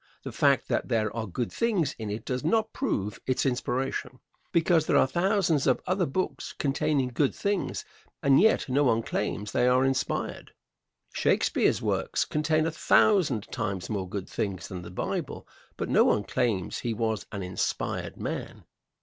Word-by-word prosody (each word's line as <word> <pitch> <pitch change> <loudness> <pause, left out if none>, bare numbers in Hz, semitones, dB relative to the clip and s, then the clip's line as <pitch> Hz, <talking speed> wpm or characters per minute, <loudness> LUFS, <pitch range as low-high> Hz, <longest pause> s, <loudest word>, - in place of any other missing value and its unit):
The - - -5
fact - - +2
that - - -1
there 110 -2 0
are 110 -1 -3
good 115 +6 -3
things 210 - +1
in 110 -2 -4
it 105 +2 -5
does 125 +1 -2
not 220 +7 +1
prove 105 - -2
its 130 - +1
inspiration, 130 0 -2 0.3
because 165 -1 +3
there - - +4
are - - +6
thousands 170 0 +1
of 130 - +3
other 185 -2 +1
books 185 +7 -3
containing 135 -1 +1
good 130 +3 0
things, 200 -2 -2 0.4
and 140 +1 +5
yet 220 +2 +3
no 140 +2 +2
one 115 -2 +2
claims 105 -1 -3
they 125 - +2
are 130 +1 +4
inspired. 135 -1 -2 0.6
Shakespeare's - - +2
works - - 0
contain 155 +1 +1
a 165 - 0
thousand 160 - +3
times 100 -5 -3
more 95 -3 -3
good 100 -1 -4
things 95 -3 -3
than 90 -2 -6
the 85 - -9
Bible, - - -4 0.3
but - - -2
no - - +4
one 105 - +2
claims 105 -9 -1
he 115 -2 -2
was 110 -3 -2
an 100 -2 -4
inspired 90 0 -3
man. - - -5
130 Hz, 165 wpm, -27 LUFS, 110-160 Hz, 0.6 s, are